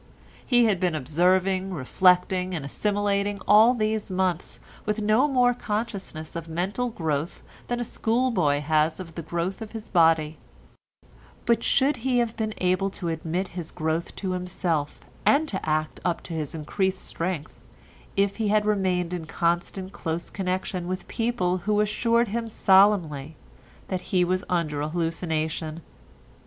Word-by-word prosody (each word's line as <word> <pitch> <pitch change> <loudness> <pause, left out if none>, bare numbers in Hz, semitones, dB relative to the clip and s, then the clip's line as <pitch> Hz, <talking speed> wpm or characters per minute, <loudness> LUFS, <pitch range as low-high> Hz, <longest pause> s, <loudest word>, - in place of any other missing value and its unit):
He 245 -2 +4
had 205 -5 +2
been 180 -3 +1
observing, 185 +6 +1
reflecting, 180 +5 +2
and 150 -4 -4
assimilating 205 +4 0
all 220 +4 +7
these 215 -2 -1
months 185 -2 -1 0.2
with 210 +1 -1
no 215 +6 +3
more 250 -3 +3
consciousness 210 -9 -4
of 165 -1 -5
mental 190 +9 -2
growth 160 -5 -3 0.2
than 240 0 -1
a - - 0
school 240 +2 0
boy 145 -9 +2
has 155 +2 +1
of 170 -3 -8
growth 175 +5 -2
of 220 0 -8
body, 160 -3 +3 1.1
but 235 -1 +3
should 275 +1 +3
he 250 +1 0
have 235 -2 +1
been 215 -1 -2
able 185 +2 +1
to 180 -3 -4
admit 165 +3 -2
his 170 -3 -6
growth 160 +2 -2
to 190 -2 -3
himself, 180 -4 -2 0.2
and 310 +3 +4
to 190 - -3
act 155 0 -1
up 175 -2 -1
to 170 - -7
his 155 -1 -3
increased 190 +5 -1
strength 165 -3 -4 0.5
if 200 0 +2
he 220 -2 0
had 210 0 +3
remained 185 -4 +1
in 175 -3 -4
constant 175 +3 -1
close 165 -2 -4
connection 185 -2 -2
with 185 +1 -4
people 225 -6 0
who 210 0 +3
assured 230 +2 +2
him 230 +2 -2
solemnly 190 -8 +3 0.5
that 185 -1 -2
he 180 -1 +1
was 185 +1 0
under 155 -5 0
a 150 - -2
hallucination? 160 -1 -2
185 Hz, 150 wpm, -26 LUFS, 165-210 Hz, 1.1 s, all